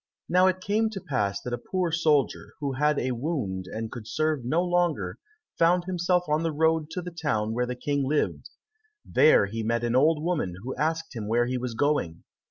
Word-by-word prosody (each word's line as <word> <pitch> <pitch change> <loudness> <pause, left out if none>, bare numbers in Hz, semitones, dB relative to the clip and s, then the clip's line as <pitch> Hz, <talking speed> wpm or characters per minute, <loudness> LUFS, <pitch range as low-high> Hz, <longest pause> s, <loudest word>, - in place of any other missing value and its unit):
Now 180 +1 +4
it 185 0 0
came 215 +4 +1
to 210 -3 -6
pass 105 - -1
that 125 - -4
a 120 - -2
poor 185 -3 -2
soldier, 155 -4 +1
who 140 -2 -2
had 150 +3 +2
a 130 0 0
wound, 120 - -3
and 110 +2 -5
could 115 -4 -8
serve 155 -2 0
no 160 +9 +1
longer, 170 - 0 0.4
found 175 +1 +4
himself 180 -1 +1
on 150 +1 +1
the 165 -1 0
road 160 0 +1
to 180 - -3
the 180 - -6
town 110 -10 -1
where 125 +1 0
the 125 - -3
King 140 +2 -1
lived. 150 +2 -1 0.6
There 155 -9 +5
he 110 +3 -4
met 115 +2 0
an 120 0 0
old 150 +3 +3
woman, 160 - -1
who 130 - -4
asked 160 -1 -2
him 110 -3 -4
where 120 +2 +2
he 125 +1 -2
was 125 -2 -4
going. 130 - 0
145 Hz, 205 wpm, -26 LUFS, 120-165 Hz, 0.6 s, There